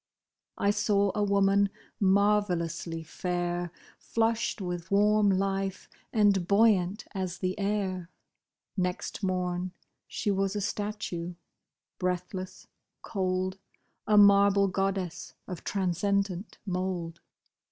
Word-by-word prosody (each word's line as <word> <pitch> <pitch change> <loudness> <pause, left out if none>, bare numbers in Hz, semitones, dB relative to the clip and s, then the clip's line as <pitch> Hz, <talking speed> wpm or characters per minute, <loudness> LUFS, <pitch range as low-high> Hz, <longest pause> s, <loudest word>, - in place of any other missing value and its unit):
I 200 - +3
saw 200 -1 +2
a 210 - -1
woman, 200 0 +3 0.3
marvellously 190 -5 +1
fair. 175 +1 -2 0.3
Flushed 225 -1 0
with 175 -2 -4
warm 210 +1 +4
life, 195 0 -1 0.2
and 200 -5 +3
buoyant 200 -1 +3
as 185 -2 -3
the 185 -1 -1
air; 195 -3 -1 0.7
Next 180 +1 -2
morn 180 -1 -1 0.3
she 210 - -1
was 195 0 0
a - - 0
statue, 190 -4 -3 0.6
breathless, 185 +1 -3 0.4
cold, 185 -1 -1 0.5
A 210 0 +4
marble 200 -1 +6
goddess 195 -2 -2
of 180 -3 -6
transcendent 195 +1 -1
mould. 180 -3 -3
195 Hz, 100 wpm, -29 LUFS, 180-200 Hz, 0.7 s, marble